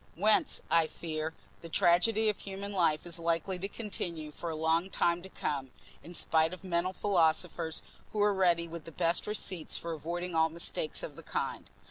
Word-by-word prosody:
Whence, 215 +1 +3
I 165 -1 +5
fear, 160 -1 -4 0.3
the 165 - -8
tragedy 205 +7 +4
of 210 - +2
human 200 +1 -5
life 165 -5 +2
is 170 -1 -3
likely 170 +3 0
to 195 - -2
continue 175 -8 -4
for 170 +3 -5
a 160 - -3
long 160 +3 +2
time 170 -2 +2
to 190 - -10
come, 140 -7 -2 0.3
in 175 - -10
spite 160 +1 +2
of 185 - -9
mental 180 0 0
philosophers 170 -3 +1 0.3
who 215 - -3
are 205 0 +4
ready 175 -3 +3
with 165 -1 -8
the 165 - -8
best 170 +1 +1
receipts 185 -6 -2
for 170 0 -4
avoiding 175 +3 -4
all 160 0 +4
mistakes 160 -1 -2
of - - -6
the - - -7
kind. - - -3
170 Hz, 185 wpm, -32 LUFS, 160-185 Hz, 0.3 s, I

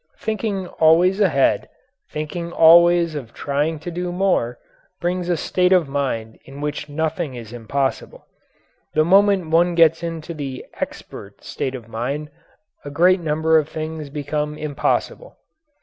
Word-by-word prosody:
Thinking 215 -3 -3
always 175 +3 +3
ahead, 155 -9 +2 0.4
thinking 170 +3 -5
always 170 0 +6
of 130 -6 -7
trying 145 +3 -1
to 175 - -6
do 175 +1 -3
more, 175 -11 0 0.4
brings 180 0 -2
a 175 - +1
state 180 +3 +1
of 180 -5 +4
mind 130 -6 -3
in 135 +1 -12
which 150 0 -4
nothing 160 -1 -2
is 115 -2 -9
impossible. 135 +4 -3 0.7
The 155 - +4
moment 195 -2 +3
one 170 +1 +3
gets 165 -1 +4
into 165 0 -5
the 140 -4 -6
"expert" - - -7
state 130 0 -4
of 120 -3 -9
mind 135 +7 -4 0.5
a 145 - -7
great 180 +6 +3
number 160 0 +2
of 155 0 -4
things 155 -1 -5
become 150 +1 -3
impossible. 155 - -2
160 Hz, 140 wpm, -21 LUFS, 145-175 Hz, 0.7 s, always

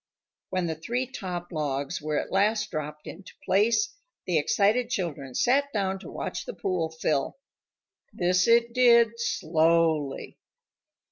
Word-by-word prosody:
When 185 -1 -1
the 165 - -1
three 235 +11 -3
top 180 -8 -6
logs 145 -4 -2
were 150 0 -2
at - - -6
last 210 +2 +1
dropped 150 0 -5
into 185 +3 -10
place, 230 - +2 0.3
the 170 -4 +2
excited 215 +10 +2
children 145 - -4
sat 280 +3 +2
down 195 -2 -1
to - - -10
watch - - -5
the - - -7
pool 180 -4 -1
fill. 155 - -1 0.7
This 180 0 +1
it 235 0 +4
did 235 -2 +5
slowly. 160 -6 +1
185 Hz, 135 wpm, -27 LUFS, 155-230 Hz, 0.7 s, did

